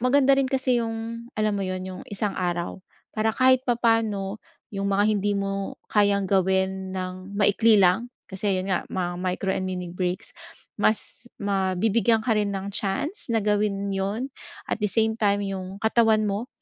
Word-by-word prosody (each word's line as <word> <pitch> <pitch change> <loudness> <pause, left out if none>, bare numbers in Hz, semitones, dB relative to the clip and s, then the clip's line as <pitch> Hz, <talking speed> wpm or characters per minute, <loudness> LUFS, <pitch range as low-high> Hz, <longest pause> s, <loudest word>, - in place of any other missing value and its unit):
maganda 270 +2 +4
rin 270 -1 +3
kasi 260 -2 +2
yung 230 +1 -5
alam 215 0 +1
mo 200 - -1
'yon 185 -1 -3
yung 185 -1 -7
isang 205 0 -2
araw, 175 0 -2 0.3
para 215 0 0
kahit 260 +1 +5
papano 225 -4 +1 0.3
yung 200 0 -2
mga 200 +1 +2
hindi 205 0 0
mo 195 0 -3 0.2
kayang 200 -1 +3
gawin 190 0 +1
ng 185 +1 -6
maikli 210 +2 +4
lang 195 +5 +4 0.2
kasi 195 0 -1
'yon 185 +1 -3
nga 180 - -1
mga 175 -1 -3
micro 185 +1 -1
and 190 -1 -2
mini 180 -2 -4
breaks 180 0 -3 0.5
mas 220 +2 0
mabibigyan 205 +3 +1
ka 240 - +2
rin 205 -1 +1
ng 195 +1 -4
chance 215 - -2
na 225 -2 +1
gawin 205 -1 0
'yon 200 +7 -2 0.4
at - - 0
the 210 - +1
same 220 +3 +2
time 205 -2 +2
yung 190 0 -5
katawan 220 -1 +3
mo, 210 +4 -2
200 Hz, 165 wpm, -25 LUFS, 190-225 Hz, 0.5 s, kahit